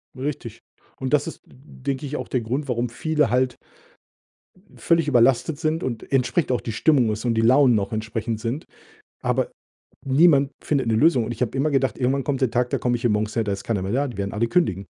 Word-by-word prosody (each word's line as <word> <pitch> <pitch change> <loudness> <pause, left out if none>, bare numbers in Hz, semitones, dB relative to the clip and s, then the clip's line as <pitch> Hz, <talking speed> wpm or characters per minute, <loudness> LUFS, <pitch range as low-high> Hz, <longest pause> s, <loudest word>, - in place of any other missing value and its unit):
Richtig. 130 -4 -5 0.4
Und 130 +1 -4
das 150 +1 +2
ist, 165 - -8
denke 135 +1 -6
ich, 145 +1 -4
auch - - -5
der 125 - -1
Grund, 130 +6 -3
warum 120 -1 -1
viele 150 +3 0
halt 125 0 +1 1.3
völlig 165 -2 +2
überlastet 135 +3 +3
sind 160 0 -1
und 120 -4 -5
entsprechend 135 +3 +1
auch 125 - +1
die 115 - -5
Stimmung 125 -1 +3
ist 105 +1 -4
und 120 -2 0
die 110 - +2
Launen 125 +2 +5
noch 100 +2 -1
entsprechend 110 0 -3
sind. 120 +8 -4 0.6
Aber - - 0 0.6
niemand 140 0 +4
findet 140 -4 0
'ne 115 - +1
Lösung 130 0 +3
und 120 - -4
ich 120 - -7
habe 125 +1 -1
immer 150 +3 +1
gedacht: 135 -1 +1
„Irgendwann 135 +2 0
kommt 135 -1 -2
der 130 -3 +2
Tag, 125 +1 0
da - - 0
komme 125 - 0
ich 120 - -5
hier 120 - +2
morgens 105 0 -1
her, 115 - +1
da 105 - -2
ist 100 - -6
keiner 110 -5 -1
mehr 95 +1 -3
da, 140 +5 +1
die 120 - -8
werden 100 0 -3
alle 110 +2 +1
kündigen.“ 105 - 0
125 Hz, 225 wpm, -23 LUFS, 115-140 Hz, 1.3 s, Launen